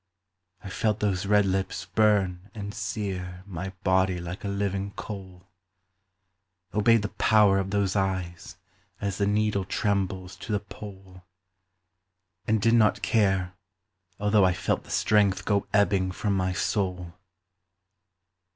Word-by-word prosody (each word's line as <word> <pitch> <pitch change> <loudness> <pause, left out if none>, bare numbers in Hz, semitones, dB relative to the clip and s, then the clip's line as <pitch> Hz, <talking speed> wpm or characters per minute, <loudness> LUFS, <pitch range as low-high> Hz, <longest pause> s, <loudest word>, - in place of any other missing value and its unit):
I 95 - -7
felt 110 +1 0
those 100 -2 0
red 105 0 +4
lips 95 0 -2
burn 100 -3 +1
and 100 -1 -6
sear 90 -5 -4
My 95 -1 -5
body 95 -1 +2
like 85 +2 -7
a - - -3
living 100 0 -2
coal; 95 -3 -9 1.2
Obeyed 110 +1 +4
the 105 - -2
power 105 -3 +4
of 95 0 -2
those 100 -1 0
eyes 95 -3 -2 0.4
As 100 -1 -3
the 100 - +2
needle 105 -1 +1
trembles 95 -2 -2
to - - -7
the 105 - +1
pole; 95 -2 -11 1.3
And 110 0 +2
did 115 +3 +3
not 110 -3 +3
care 95 -3 +1 0.7
although 105 0 +3
I 90 -1 +4
felt 90 - -1
The - - -16
strength 105 -3 +2
go 100 -2 +1
ebbing 100 -2 +2
from 100 +2 -1
my 95 -1 0
soul. 90 -2 -2
100 Hz, 135 wpm, -26 LUFS, 95-105 Hz, 1.3 s, red